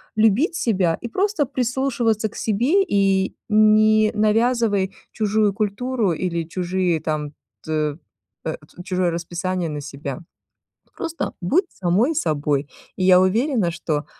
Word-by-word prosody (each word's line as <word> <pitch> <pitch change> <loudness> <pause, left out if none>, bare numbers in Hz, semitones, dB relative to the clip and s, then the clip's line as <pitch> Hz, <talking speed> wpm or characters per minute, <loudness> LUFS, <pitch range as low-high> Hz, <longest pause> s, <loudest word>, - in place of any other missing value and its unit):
любить 225 - +3
себя 185 - +1
и 235 - -4
просто 375 - 0
прислушиваться 240 -4 0
к - - -17
себе 245 - +2
и 195 - +1
не 215 0 +5
навязывай 215 -2 +1 0.2
чужую 215 -1 +1
культуру 215 +2 -1
или 170 0 -2
чужие 175 0 -1
там, 150 -1 -3 0.3
т 155 -2 -1 0.5
э, 160 - -2 0.3
чужое 185 -1 0
расписание 175 +1 -3
на 150 -1 -4
себя. 140 -1 -6 0.8
Просто 330 0 -4
будь 315 - +2
самой 200 - +1
собой. 145 - 0 0.3
Я 185 -1 +5
уверена, 215 - +1
что 155 -2 -3
195 Hz, 120 wpm, -22 LUFS, 170-230 Hz, 0.8 s, не